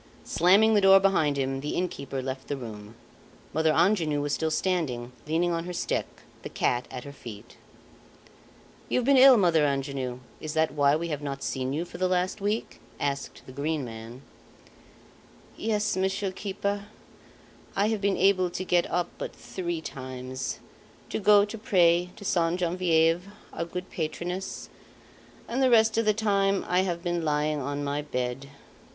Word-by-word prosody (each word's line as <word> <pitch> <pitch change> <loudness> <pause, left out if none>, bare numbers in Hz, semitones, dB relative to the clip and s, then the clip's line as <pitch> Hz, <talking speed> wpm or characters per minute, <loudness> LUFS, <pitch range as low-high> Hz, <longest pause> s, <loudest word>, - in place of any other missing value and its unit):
Slamming 200 +6 +4
the 205 - +4
door 195 0 +8
behind 160 -7 +2
him, 135 0 -1
the 150 - -3
innkeeper 140 -7 -3
left 130 0 -5
the 145 - -2
room. 110 -3 -9 0.6
Mother 160 +1 +3
Angenoux 160 -5 +2
was 145 0 -1
still 160 - 0
standing, 155 -9 -1 0.2
leaning 170 +3 +1
on 165 0 -2
her 180 - -5
stick, - - -1 0.3
the - - -7
cat 120 0 0
at 125 -1 -7
her 140 - -9
feet. 115 -6 -11 1.3
"You've 250 - +1
been 280 +1 +5
ill, 260 -1 +9
Mother 170 -6 +4
Angenoux? 135 -3 -2 0.2
Is 155 +1 -5
that 160 0 +2
why 145 -1 +4
we 170 +2 -2
have 150 -2 -3
not 140 -1 -5
seen 130 -1 -2
you 160 +5 -2
for - - -10
the 185 - +2
last 185 +2 0
week?" 210 +3 -2 0.2
asked 140 -1 -3
the - - -11
Green 145 +1 -2
Man. 115 +3 -9 1.3
"Yes, 215 -1 0
Monsieur 190 +1 -1
keeper. 200 +1 -3 0.9
I 205 +2 +2
have 220 -2 -1
been 200 -1 +1
able 185 -2 +3
to 175 +1 -4
get 175 -1 +2
up 175 0 0
but - - -5
three 175 -3 -4
times, 130 -2 -5 0.5
to - - -1
go 205 0 +6
to 210 +2 -7
pray 175 -4 +3
to 205 - -11
Sainte 170 0 +1
Genevieve, 170 -1 +2 0.3
our 170 - -3
good 180 +2 -7
patroness, 175 +3 -4 0.8
and 250 +3 -1
the 260 - +5
rest 220 -2 +5
of 230 0 +1
the 215 - +4
time 200 -2 +1
I 180 - +2
have 175 -2 -1
been 175 -2 -1
lying 150 -1 0
on 145 +2 -3
my 145 +1 -1
bed. 125 -2 -3
170 Hz, 170 wpm, -27 LUFS, 140-195 Hz, 1.3 s, ill